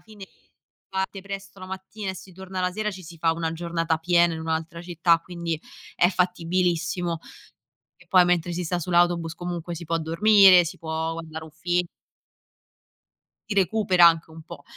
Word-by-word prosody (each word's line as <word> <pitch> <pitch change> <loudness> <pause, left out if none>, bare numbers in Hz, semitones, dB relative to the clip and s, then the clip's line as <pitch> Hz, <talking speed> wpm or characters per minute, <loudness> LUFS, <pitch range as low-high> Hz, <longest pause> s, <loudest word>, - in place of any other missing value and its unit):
fine 210 -3 -13 0.6
parte 190 0 -3
presto 195 0 -8
la 185 - -8
mattina 190 +2 -6
e - - -7
si 185 +1 -12
torna 190 0 -6
la 180 0 0
sera, 215 +2 -2
ci 185 -1 -9
si 170 +1 -11
fa 165 0 +2
1 165 -1 -3
giornata 165 -1 -1
piena 170 0 +3
in 160 - -6
un'altra 160 +1 -3
città, 170 -1 +2
quindi 170 -2 -4 0.4
è 175 - +4
fattibilissimo 175 -1 0 0.8
e 185 - -22
poi 180 -1 +6
mentre 175 -1 +1
si 180 +1 -3
sta 175 +2 -1
sull'autobus 175 -1 +1
comunque 175 -1 -5
si 170 +1 -8
può 165 +1 -1
dormire, 185 +2 +6
si 165 - -7
può 160 0 -3
guardare 160 -1 -7
un 160 - -12
film 175 +2 0 1.7
si 205 - -1
recupera 190 -2 +4
anche 165 -1 +2
un 160 0 -11
po'. 155 -3 -11
175 Hz, 170 wpm, -25 LUFS, 165-185 Hz, 1.7 s, poi